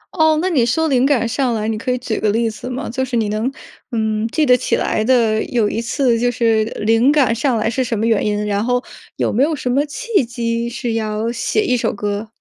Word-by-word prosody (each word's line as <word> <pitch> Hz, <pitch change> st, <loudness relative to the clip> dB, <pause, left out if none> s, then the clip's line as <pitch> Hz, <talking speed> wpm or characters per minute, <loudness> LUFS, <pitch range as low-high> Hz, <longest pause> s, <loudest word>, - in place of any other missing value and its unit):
哦， 315 Hz, -2 st, +4 dB
那 365 Hz, -, 0 dB
你 285 Hz, -9 st, +2 dB
说 315 Hz, +8 st, +1 dB
灵 260 Hz, -2 st, +3 dB
感 255 Hz, -5 st, +2 dB
上 245 Hz, 0 st, 0 dB
来， 215 Hz, -1 st, -2 dB
你 220 Hz, -, -1 dB
可 240 Hz, +4 st, -3 dB
以 250 Hz, -, 0 dB
举 245 Hz, -3 st, -3 dB
个 215 Hz, -, +1 dB
例 230 Hz, +3 st, +1 dB
子 225 Hz, +3 st, -6 dB
吗？ 255 Hz, +2 st, -4 dB
就 260 Hz, +3 st, -2 dB
是 245 Hz, -2 st, -2 dB
你 220 Hz, -2 st, 0 dB
能 215 Hz, +5 st, -1 dB, 0.4 s
嗯， 220 Hz, -1 st, -1 dB
记 305 Hz, +6 st, +1 dB
得 250 Hz, -2 st, +6 dB
起 250 Hz, -, 0 dB
来 215 Hz, -, 0 dB
的 225 Hz, -3 st, +2 dB
有 230 Hz, -4 st, +1 dB
一 225 Hz, +2 st, -2 dB
次， 235 Hz, 0 st, +1 dB
就 245 Hz, +1 st, +2 dB
是 225 Hz, -2 st, +2 dB, 0.2 s
灵 225 Hz, +5 st, +4 dB
感 275 Hz, -7 st, +3 dB
上 235 Hz, +1 st, 0 dB
来 215 Hz, -, 0 dB
是 235 Hz, +3 st, 0 dB
什 235 Hz, -2 st, -2 dB
么 220 Hz, -, 0 dB
原 225 Hz, -3 st, +2 dB
因， 210 Hz, 0 st, -1 dB
然 205 Hz, 0 st, 0 dB
后 245 Hz, +1 st, 0 dB, 0.3 s
有 -, -, -1 dB
没 235 Hz, -, +1 dB
有 310 Hz, +3 st, +2 dB
什 250 Hz, -3 st, -3 dB
么 275 Hz, +3 st, +2 dB
契 455 Hz, -, 0 dB
机 235 Hz, -1 st, -2 dB
是 240 Hz, -1 st, -3 dB
要 220 Hz, +1 st, -2 dB
写 335 Hz, -, 0 dB
一 250 Hz, -, +2 dB
首 240 Hz, -, 0 dB
歌？ 205 Hz, +1 st, -3 dB
235 Hz, 265 characters per minute, -18 LUFS, 220-260 Hz, 0.4 s, 得